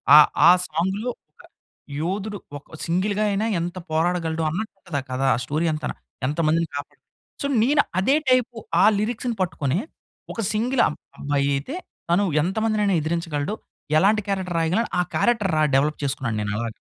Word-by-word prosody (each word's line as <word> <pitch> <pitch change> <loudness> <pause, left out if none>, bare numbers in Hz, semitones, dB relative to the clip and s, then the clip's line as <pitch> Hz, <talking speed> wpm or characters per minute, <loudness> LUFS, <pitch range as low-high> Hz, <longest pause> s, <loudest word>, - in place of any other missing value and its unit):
ఆహ్, 150 0 +9 0.2
ఆ - - +10 0.2
సాంగ్‌లో 190 +9 -1 0.3
ఆహ్, - - -18 0.5
యోధుడు 200 +5 -2 0.2
ఒక 150 +2 -13
సింగిల్‌గా 195 +5 0
అయినా, 200 +2 0
ఎంత 175 +2 -4
పోరాడగలడు 165 0 0
అన్నట్టుంటదా 180 -4 -4
కధ. 130 +1 -3
ఆ - - -2
స్టోరీ 155 +3 -1
అంతన. 155 - -3 0.4
ఎంత 150 +4 -3
మందిని 165 +1 +2
కాపాడు. 145 0 -7 0.4
సో, - - -2 0.2
నేను 290 +4 +4 0.2
అదే 265 +9 +3
టైపు 250 -1 +3 0.3
ఆ - - +6 0.2
లిరిక్స్‌ని 235 +2 -2
పట్టుకొని, 155 -3 0 0.5
ఒక 230 - -3
సింగిల్ 240 +4 +1
అబ్ - - -5 0.2
అబ్బాయి 140 -1 0
అయితే, 140 - -4 0.4
తను 190 +4 +4 0.2
ఎంత 185 +4 -2
మందినైనా 210 -3 +2
ఎదిరించగలడు, 160 +2 -2 0.4
ఎలాంటి 210 +5 +4
క్యారెక్టర్ 190 -3 -1
రాయగలను 180 +8 +1
ఆ - - +5
క్యారెక్టర్ 225 -6 +2
రా 155 - +4
డెవలప్ 150 +3 +1
చేసుకున్నాను 130 -5 -2
నేను 105 -1 -2
అలాగా. 115 0 -4
175 Hz, 155 wpm, -23 LUFS, 150-210 Hz, 0.5 s, ఆ